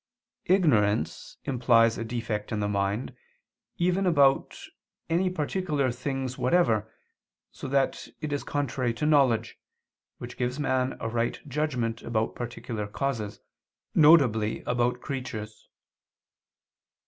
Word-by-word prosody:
Ignorance 115 - +2
implies 115 -3 +3
a - - -2
defect 115 -2 -4
in 110 - -1
the 105 - 0
mind, 100 +3 -1 0.6
even 180 +2 +1
about 140 -5 +3 0.5
any 180 +3 +2
particular 150 -5 -1
things 130 +1 -4
whatever, 115 - +2 0.6
so - - -8
that 135 0 0
it 155 -2 -3
is 145 - -2
contrary 130 -4 -1
to 135 - -2
knowledge, 140 -7 +2 0.6
which 120 +1 -9
gives 125 +3 -2
man 130 -2 0
a - - -3
right 115 +1 -1
judgment 125 -6 -1
about 110 -1 -1
particular 115 -3 -5
causes, 110 -2 -3 0.5
viz. 125 -9 +5
about 125 0 0
creatures. 110 -5 -6
125 Hz, 110 wpm, -27 LUFS, 115-145 Hz, 0.6 s, viz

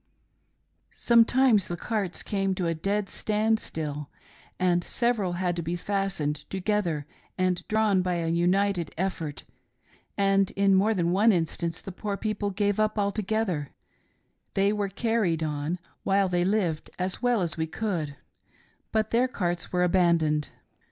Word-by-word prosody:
"Sometimes 235 -2 +4
the 175 - -4
carts 205 -3 -2
came 195 -2 -1
to 180 - -2
a 165 - +1
dead 200 +5 -1
stand 215 +2 0
still, 150 -5 -5 0.5
and 175 -1 +2
several 225 -6 0
had 175 -1 -1
to - - -1
be 170 +2 -2
fastened 190 -5 -1
together 190 -6 -1 0.3
and 185 -1 +1
drawn 215 -3 +2
by 180 -1 -1
a 170 -1 -1
united 180 +2 +1
effort, 170 -5 -3 0.7
and 195 -1 +3
in 195 0 +4
more 205 +4 +3
than 170 -2 +1
one 210 +5 +5
instance 165 -2 -1
the 195 - -7
poor 200 +2 -4
people 210 -1 -2
gave 205 +1 0
up 215 0 +1
altogether; 200 -6 -1 0.4
— - - -46
they 200 +1 +3
were 205 -1 -1
carried 195 -6 0
on, 150 +2 -2 0.2
while 195 0 +2
they 175 -1 +1
lived, 185 -6 0
as 185 +3 -2
well 245 -2 +2
as 170 -2 -2
we 160 0 -2
could; 160 -5 -3 0.8
but 220 -1 0
their 245 +2 +3
carts 175 -8 -2
were 180 0 +2
abandoned. 170 -4 +2
190 Hz, 150 wpm, -27 LUFS, 170-210 Hz, 0.8 s, one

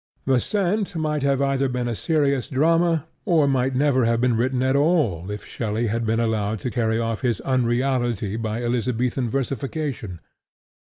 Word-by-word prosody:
The 130 -2 +3
Cent 200 - -1
might 155 -3 -1
either 140 0 +2
have 135 -1 0
been 125 -1 -1
a 120 - -1
serious 140 -2 0
drama 165 +3 +2 0.2
or 165 -7 +3
might 130 -1 +1
never 130 -2 +3
have 115 0 +2
been 125 -1 +2
written 125 +2 0
at 130 +1 +2
all 140 - +1
if 105 0 -6
Shelley 110 0 -2
had 115 - -1
not 115 - -3
been 115 +1 +1
allowed 110 -2 0
to 125 - -3
carry 110 -2 0
off 115 +1 -2
its 120 -4 +1
unreality 120 -4 0
by 115 +1 -3
Elizabethan 120 +1 -1
versification. 135 - -3
125 Hz, 170 wpm, -23 LUFS, 115-140 Hz, 0.2 s, The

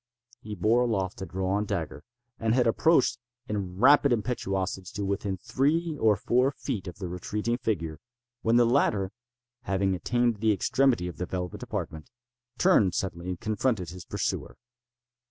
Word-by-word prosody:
He 105 -2 -6
bore 110 +6 +3
aloft 100 -6 -1
a 95 - -4
drawn 95 +3 -1
dagger, 80 -8 -4 0.4
and 115 0 +1
had 125 -2 +3
approached, 145 +6 +3 0.3
in 95 -4 -3
rapid 140 +4 +6
impetuosity, 95 -5 -1
to 100 -1 -2
within 100 0 -2
three 155 - 0
or 110 -2 +5
four 125 +6 +2
feet 125 -8 -5
of 90 - -7
the 95 -3 -5
retreating 105 +7 -2
figure, 85 -10 -2 0.4
when 115 +1 +2
the 120 0 +6
latter, 105 -6 +2 0.5
having 95 -1 +1
attained 120 +4 +1
the 110 +1 +2
extremity 120 -2 +2
of 90 - -7
the 90 - -3
velvet 90 -1 -4
apartment, 80 -1 -5 0.5
turned 110 - +4
suddenly 90 -1 -3
and 90 - -4
confronted 110 -5 -1
his 90 -1 -9
pursuer. - - -3
105 Hz, 155 wpm, -28 LUFS, 95-120 Hz, 0.5 s, rapid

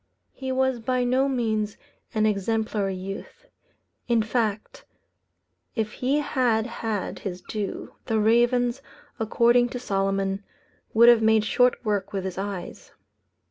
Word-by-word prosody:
He 265 -1 -5
was 260 -1 +1
by 255 +2 0
no 260 +3 +2
means 220 -5 -1 0.4
an 215 0 +3
exemplary 210 -1 0
youth. 195 - -8 0.6
In 235 -2 +3
fact, 225 - -2 0.9
if 220 -2 -1
he 265 +6 0
had 245 -6 +1
had 225 -4 -4
his 180 -2 -6
due, 210 -3 -5
the 225 - 0
ravens, 240 +3 +3 0.4
according 235 +2 +3
to 250 - -5
Solomon, 195 -1 -1 0.5
would 235 +2 +7
have 240 -2 +7
made 220 -1 +4
short 250 +2 +2
work 205 -2 -1
with 195 -2 -2
his 190 0 -4
eyes. 195 -2 -6
220 Hz, 130 wpm, -25 LUFS, 205-245 Hz, 0.9 s, would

